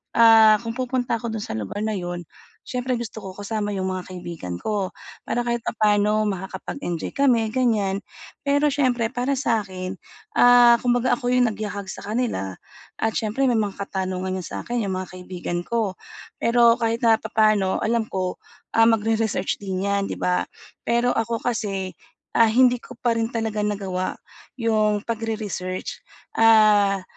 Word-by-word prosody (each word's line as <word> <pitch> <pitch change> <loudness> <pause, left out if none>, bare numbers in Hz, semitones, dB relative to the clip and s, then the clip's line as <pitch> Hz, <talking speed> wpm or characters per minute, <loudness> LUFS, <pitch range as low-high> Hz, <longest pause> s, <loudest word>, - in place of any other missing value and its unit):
ah, 225 -2 +7
kung 230 -1 -5
pupunta 255 -1 -1
ako 235 -2 -4
dun 215 - -3
sa - - -6
lugar 110 - -5
na 220 - 0
yun, 175 -2 -4 0.4
siyempre 250 0 -1
gusto 225 -2 -6
ko 190 -1 -8
kasama 205 0 -3
yung 190 -1 -1
mga 185 -1 -5
kaibigan 170 - -6
ko, 205 -3 -2 0.4
para 240 - 0
kahit 235 0 0
papaano 210 -1 +2
makakapag 190 +5 -5
enjoy 170 -2 -3
kami 245 -6 +3
ganyan, 215 -6 +1 0.4
pero 285 +1 +2
siyempre 250 -5 +1
para 250 +3 0
sa 240 -4 +1
akin, 185 -1 -6 0.4
ah, 245 -1 +8
kumbaga 245 0 +2
ako 245 -1 -1
yung 250 -1 +4
nagyakag 205 -1 -5
sa - - -8
kanila 210 - -2 0.4
at 225 - +1
siyempre 220 +5 -1
may 235 -3 +2
mga 205 -2 -2
katanungan 185 0 -3
'yon 180 - -7
sa - - -6
akin 240 0 -1
'yong 190 - -2
mga 185 -1 -5
kaibigan 180 -1 -4
ko. 220 -5 -1 0.5
Pero 235 0 +5
kahit 230 0 -1
napapaano 215 -3 +3
alam 225 0 0
ko, 185 -1 -3 0.4
ah, 225 0 +6
magre-research 220 -3 0
din 190 -1 -3
'yan, 200 0 0
'di - - -3
ba? 180 0 +1 0.4
Pero 235 +1 +2
ako 230 0 -2
kasi, 200 -6 -2 0.4
ah, 230 - +5
hindi 245 +1 +4
ko 250 - -12
pa 240 -2 +1
rin 225 0 0
talaga 220 -2 -1
nagawa 195 -3 -2 0.4
'yong 215 -3 +1
pagre-research, 215 -5 -4 0.4
ah, 210 -3 +5
215 Hz, 160 wpm, -23 LUFS, 190-235 Hz, 0.5 s, ah